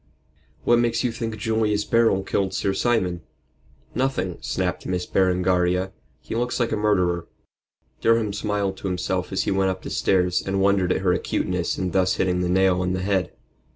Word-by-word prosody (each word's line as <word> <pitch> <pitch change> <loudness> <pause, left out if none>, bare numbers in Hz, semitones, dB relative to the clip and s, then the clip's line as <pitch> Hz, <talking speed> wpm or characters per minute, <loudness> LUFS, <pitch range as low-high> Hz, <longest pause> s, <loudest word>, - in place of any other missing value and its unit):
"What 120 0 +4
makes 120 +1 +1
you 125 - +1
think 115 -1 -4
Julius 105 -1 0
Beryl 115 -5 +3
killed 95 -1 -1
Sir 95 - 0
Simon?" 95 -5 0 0.7
"Nothing," 130 -9 -1
snapped - - -2
Miss 90 -1 -1
Berengaria; 90 0 +1 0.3
"he - - -6
looks 120 +2 -1
like 120 -1 0
a - - +1
murderer." 90 -5 +1 0.7
Durham 115 -2 +2
smiled 100 -2 -2
to - - -5
himself 90 -1 -2
as - - 0
he - - -1
went 95 0 +2
up 95 0 -4
the - - -6
stairs 90 -2 +2
and 95 0 -1
wondered 95 -2 +2
at - - 0
her 90 -2 +2
acuteness 90 -1 -1
in 95 -1 -2
thus 95 0 +2
hitting 90 -1 0
the 90 - 0
nail 95 0 +3
on 90 0 0
the 95 0 -2
head. 95 -2 0
95 Hz, 180 wpm, -23 LUFS, 90-110 Hz, 0.7 s, What